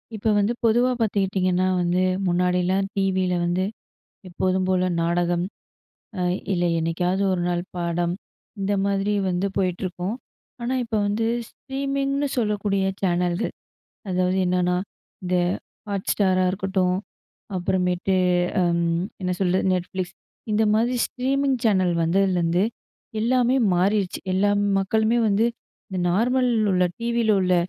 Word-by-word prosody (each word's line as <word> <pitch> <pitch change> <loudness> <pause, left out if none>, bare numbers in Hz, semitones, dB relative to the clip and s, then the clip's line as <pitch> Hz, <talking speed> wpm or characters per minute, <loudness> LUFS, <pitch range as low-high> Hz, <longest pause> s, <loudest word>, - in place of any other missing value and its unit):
இப்பொ 215 +1 -1
வந்து 205 +3 +1
பொதுவா 240 +3 +3
பாத்துக்கிட்டீங்கன்னா 190 -4 +1
வந்து, 175 +1 +1 0.3
முன்னாடிலாம் 180 +2 +1
டீவியில 190 -2 +1
வந்து, 175 +2 0 0.7
எப்போதும் 185 +1 0
போல 185 -1 +2 0.2
நாடகம், 175 +1 +1 0.7
அ - - -1 0.3
இல்ல 175 -1 +1
என்னைக்காவது 175 +4 0
ஒரு 185 -1 0
நாள் 175 0 -1
பாடம், 170 0 -1 0.5
இந்த 195 +1 0
மாதிரி 200 +1 0 0.2
வந்து 180 +2 0
போயிட்டுருக்கும். 185 +1 -2 0.5
ஆனா 240 +2 -1
இப்போ 225 -2 -2
வந்து, 215 +2 0 0.2
ஸ்ட்ரீமிங்னு 275 +1 -2
சொல்லக்கூடிய 205 -3 0 0.2
சேனலு. 180 +2 +1 0.6
அதாவது 185 +1 +1
என்னன்னா, 180 0 +1 0.5
இந்த 180 0 0 0.5
Hotstarஅ 190 -1 +1
இருக்கட்டும், 190 -1 0 0.6
அப்புறமேட்டு 180 0 0 0.5
ம் 170 0 +1 0.2
என்ன 180 -1 -1
சொல்ற 185 -1 +2
Netflix 185 0 -2 0.4
இந்த 215 +1 +2
மாதிரி 235 +3 +2
ஸ்ட்ரீமிங்னு 265 0 0
சேனல் 190 -5 +3
வந்ததுலேருந்து, 175 0 +2 0.6
எல்லாமே 250 +2 +2 0.2
மாறிர்ச்சு. 195 +1 +1
எல்லா 195 +2 +2 0.3
மக்களுமே 220 +4 +2
வந்து 205 +2 +2 0.4
இந்த 190 -3 -4
நார்மல் 250 +6 +2 0.2
உள்ள 180 0 +3
டிவியில 235 -1 0
உள்ள 185 -1 +2
190 Hz, 115 wpm, -23 LUFS, 180-215 Hz, 0.7 s, பொதுவா